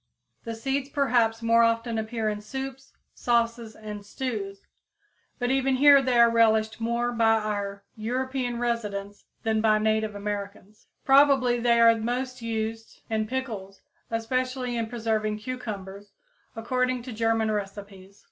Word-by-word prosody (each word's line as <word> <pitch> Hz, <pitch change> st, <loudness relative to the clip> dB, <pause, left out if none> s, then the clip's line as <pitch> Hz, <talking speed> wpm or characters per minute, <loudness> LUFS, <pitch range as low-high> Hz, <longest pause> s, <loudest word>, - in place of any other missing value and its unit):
The 230 Hz, -1 st, -4 dB
seeds 270 Hz, +4 st, -2 dB
perhaps 240 Hz, -5 st, +1 dB
more 230 Hz, 0 st, +4 dB
often 230 Hz, 0 st, +1 dB
appear 220 Hz, 0 st, -3 dB
in 210 Hz, -1 st, -2 dB
soups, 265 Hz, +4 st, -7 dB, 0.2 s
sauces 235 Hz, -1 st, 0 dB
and 210 Hz, -1 st, -8 dB
stews, 205 Hz, -3 st, -5 dB, 0.7 s
but 245 Hz, -1 st, -1 dB
even 265 Hz, 0 st, +2 dB
here 280 Hz, +1 st, +7 dB
they 255 Hz, -2 st, +1 dB
are 235 Hz, 0 st, +8 dB
relished 220 Hz, -1 st, +2 dB
more 235 Hz, +1 st, 0 dB
by 225 Hz, -2 st, +3 dB
our 205 Hz, -2 st, -3 dB
European 250 Hz, +2 st, -2 dB
residents 205 Hz, -4 st, -3 dB, 0.2 s
than 220 Hz, -1 st, +1 dB
by 215 Hz, -1 st, +4 dB
native 215 Hz, 0 st, 0 dB
Americans. 205 Hz, 0 st, -6 dB, 0.2 s
Probably 270 Hz, -3 st, +5 dB
they 235 Hz, 0 st, +3 dB
are 230 Hz, 0 st, +7 dB
most 245 Hz, +3 st, -3 dB
used 225 Hz, 0 st, -4 dB
in 215 Hz, -1 st, 0 dB
pickles, 215 Hz, -6 st, -5 dB, 0.3 s
especially 250 Hz, +2 st, -2 dB
in 230 Hz, -1 st, -1 dB
preserving 220 Hz, -2 st, -1 dB
cucumbers 205 Hz, -4 st, -7 dB, 0.4 s
according 250 Hz, +2 st, -1 dB
to 250 Hz, -1 st, -7 dB
German 225 Hz, 0 st, +1 dB
recipes. 200 Hz, -1 st, -6 dB
230 Hz, 135 wpm, -26 LUFS, 215-245 Hz, 0.7 s, are